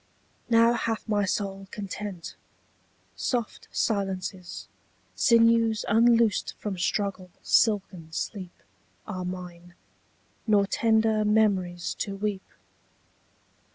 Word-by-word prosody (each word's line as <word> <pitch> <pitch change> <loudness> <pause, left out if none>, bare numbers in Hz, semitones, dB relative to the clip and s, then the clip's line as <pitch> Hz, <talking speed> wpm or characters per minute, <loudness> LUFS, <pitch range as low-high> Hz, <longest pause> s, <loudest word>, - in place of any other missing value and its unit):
Now 230 0 +5
hath 230 -1 -2
my 205 -2 +1
soul 195 0 -3
content. 195 -3 -6 0.8
Soft 240 -4 -3
silences, 190 -3 -2 0.5
Sinews 230 -2 +4
unloosed 230 0 +3
from 205 -2 -4
struggle, 195 -1 -1
silken 190 -7 +1
sleep, 185 +1 -6 0.4
27 190 -4 -5
Are - - -4
mine; 175 -1 -8 0.7
nor 205 -2 +4
tender 220 0 +2
memories 195 -5 +1
to 200 - -3
weep. 200 -1 -3
205 Hz, 90 wpm, -27 LUFS, 185-220 Hz, 0.8 s, Now